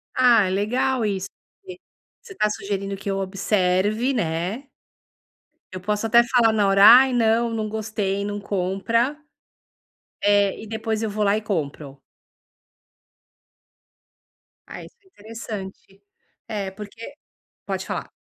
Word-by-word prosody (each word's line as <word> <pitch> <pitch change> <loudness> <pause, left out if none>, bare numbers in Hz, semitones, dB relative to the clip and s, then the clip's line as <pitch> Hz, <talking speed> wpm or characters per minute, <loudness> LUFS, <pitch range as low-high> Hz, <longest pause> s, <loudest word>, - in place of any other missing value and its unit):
Ah, 240 -5 +5
é - - -1
legal 230 +5 0
isso, 195 -2 -2 0.4
que 375 -1 -10 0.4
você 385 - -13
tá 210 - +1
sugerindo 195 -1 -4
que 200 - -6
eu 195 - -1
observe, 195 +5 0
né. 190 - -3 1.1
Eu 185 - -7
posso 210 +3 -2
até 235 +1 +6
falar 235 -2 +3
na 205 -2 +2
hora, 195 +1 +5
ai 255 +4 +8
não, 230 0 +2
não 215 -1 -2
gostei 210 -2 -3
não 205 0 -4
compra, 205 +8 -1 1.0
eh, 205 0 +2
e 220 - -9
depois 220 0 -3
eu 220 - -2
vou 210 +1 -2
lá 200 +1 +3
e 215 - -2
compro. 150 -8 -4 2.7
Ah, - - -8
isso - - -15
é - - -36
interessante, 205 - -9 0.4
é 200 -3 -4
porque. 215 +6 -10 0.5
Pode - - -4
falar. - - -5
210 Hz, 130 wpm, -23 LUFS, 195-230 Hz, 2.7 s, ai